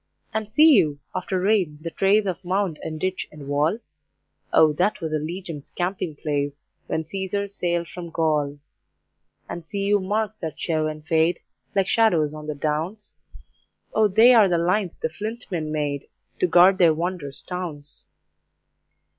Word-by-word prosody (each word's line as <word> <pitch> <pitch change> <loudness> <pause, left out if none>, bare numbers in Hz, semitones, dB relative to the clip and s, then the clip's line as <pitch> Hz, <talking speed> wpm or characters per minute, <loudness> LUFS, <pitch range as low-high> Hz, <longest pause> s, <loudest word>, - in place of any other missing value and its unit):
And 220 -1 -2
see 310 +8 +6
you, 155 - +3 0.2
after 185 0 -2
rain, 185 -6 +1
the 165 +2 -6
trace 200 +4 +3
Of 185 -1 -3
mound 185 -3 -1
and 155 -1 -5
ditch 185 +3 -2
and 150 -2 -11
wall? 145 +7 +1 0.7
O 155 -1 +5
that 185 +7 +1
was 160 -3 -4
a 155 - +1
Legion's 165 -1 -6
camping 180 -3 -3
place, 145 -1 -2 0.3
When 160 - -1
Caesar 195 +4 -3
sailed 175 -3 -2
from 175 0 -8
Gaul. 150 -3 0 0.9
And 170 - -6
see 200 +4 -4
you 205 0 +3
marks 215 +2 -2
that 160 -3 -5
show 155 -2 0
and 155 0 -6
fade, 160 +2 +2 0.4
Like 195 -1 +2
shadows 175 -11 +3
on 155 0 -8
the 150 - -3
Downs? 160 +9 -3 0.8
O 220 -1 +4
they 225 +6 +6
are 215 -5 +6
the 175 - +2
lines 180 +2 0
the - - -2
Flint 215 +9 -6
Men 155 -4 -2
made 145 -2 -2 0.3
To 180 - +3
guard 180 +3 +6
their 165 -3 +5
wondrous 165 -4 -4
towns. 165 -6 -6
175 Hz, 165 wpm, -24 LUFS, 155-195 Hz, 0.9 s, see